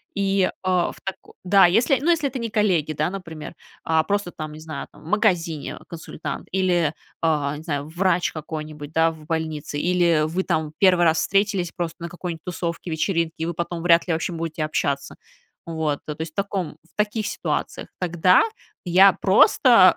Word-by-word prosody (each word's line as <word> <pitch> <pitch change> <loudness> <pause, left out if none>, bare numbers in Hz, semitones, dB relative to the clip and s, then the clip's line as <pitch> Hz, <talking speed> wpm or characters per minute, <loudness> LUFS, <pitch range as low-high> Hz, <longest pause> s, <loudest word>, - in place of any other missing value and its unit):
И, 195 -1 +2
а, 185 -2 +1
в - - -14
тако 195 - -7
да, 190 0 +6
если, 235 - +3
ну, 285 - -6
не 345 - +6
если 315 -4 0
это 260 0 -5
не 230 -1 -3
коллеги, 185 -8 +1
да 155 +4 -1
например, 165 -6 -7 0.3
а 160 -1 +2
просто, 200 0 -1
там, 155 -2 -7
не 155 - -10
знаю 155 -3 -6
там, - - -17
в - - -17
магазине 175 -7 0
консультант, 165 -1 -7
или, 175 -5 +2 0.3
а, 150 -3 +1
не 155 - -10
знаю 145 -3 -3
врач 180 +1 +1
какой-нибудь 155 -1 -7
да 165 0 +3
в 155 -1 -13
больнице, 160 -3 -3
или 170 -2 +3
вы, 170 +4 -1
там, 155 -3 -1
1 180 -3 +5
раз 160 -1 +3
встретились 195 -1 +1
просто 170 -2 -4
на 170 - -4
какой-нибудь 175 -2 -6
тусовке, 170 -1 -4
вечеринке, 165 0 0
и 160 - -2
вы 170 - -2
потом 170 0 -4
вряд 170 0 +4
ли 175 - +1
вообще 165 +2 -2
будете 165 -1 -3
общаться. 140 -2 -2 0.5
Вот, 160 -3 -1
э, 150 - -4
то 160 - -7
есть, 160 - -4
в - - -51
таком 195 -6 -3
в 165 - -30
таких 210 0 -1
ситуациях. - - -3
Тогда 180 0 +4 0.4
я 190 +3 +7
просто, 195 +1 +6
170 Hz, 190 wpm, -23 LUFS, 160-190 Hz, 0.5 s, я